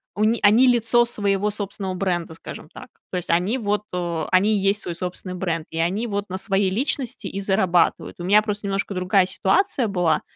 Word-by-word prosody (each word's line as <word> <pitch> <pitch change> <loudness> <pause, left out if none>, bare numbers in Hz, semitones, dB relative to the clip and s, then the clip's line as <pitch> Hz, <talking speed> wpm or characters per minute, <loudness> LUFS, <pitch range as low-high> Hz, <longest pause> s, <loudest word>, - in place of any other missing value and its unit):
У 210 - 0
ни 225 +1 +2
они 220 +5 +6
лицо 240 0 +4
своего 205 -3 0
собственного 200 -2 -4
бренда, 175 -3 -2
скажем - - -9
так. - - -11 0.2
То 185 - -2
есть, 180 - -5
они 180 +8 +1
вот 210 -3 -1
о 170 -3 -2
они 200 +4 +4
и - - +2
есть 195 +2 +1
свой 175 - -4
собственный 180 +1 -5
бренд, 170 -3 -2
и 165 - -4
они 185 +8 0
вот 205 -2 -3
на 185 - -3
своей 195 -1 +1
личности 250 +4 -2
и 195 - -5
зарабатывают. 190 -3 +1
У 175 - -5
меня 205 +3 +5
просто 210 -1 -4
немножко 195 +1 -2
другая 185 +1 +2
ситуация 250 - +1
была. 180 -5 +1
195 Hz, 205 wpm, -22 LUFS, 180-210 Hz, 0.2 s, они